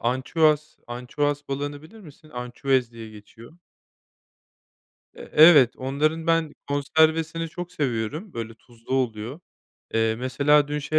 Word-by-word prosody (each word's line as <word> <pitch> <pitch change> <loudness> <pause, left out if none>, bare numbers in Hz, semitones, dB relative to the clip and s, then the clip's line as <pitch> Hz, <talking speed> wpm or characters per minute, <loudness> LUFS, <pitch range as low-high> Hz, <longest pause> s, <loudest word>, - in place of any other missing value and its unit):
ançüez 150 +5 +1
ançüez 140 +4 -3
balığını 145 +1 -4
bilir 220 +8 -15
misin? 155 -3 -16
Ançüez 125 -1 -1
diye 115 -1 -10
geçiyor. 110 +4 -15 1.6
Eee, - - -11
evet 150 -6 +7
onların 155 +5 -1
ben 165 -2 +1
konservesini 160 +3 +1
çok 175 +2 -8
seviyorum 145 - -3
böyle 115 -1 -6
tuzlu 120 +2 -8
oluyor. 125 +3 -2 0.5
Eee, 115 0 +2
mesela 145 +3 +2
dün 150 0 -2
şey 155 +2 0
145 Hz, 120 wpm, -24 LUFS, 120-155 Hz, 1.6 s, evet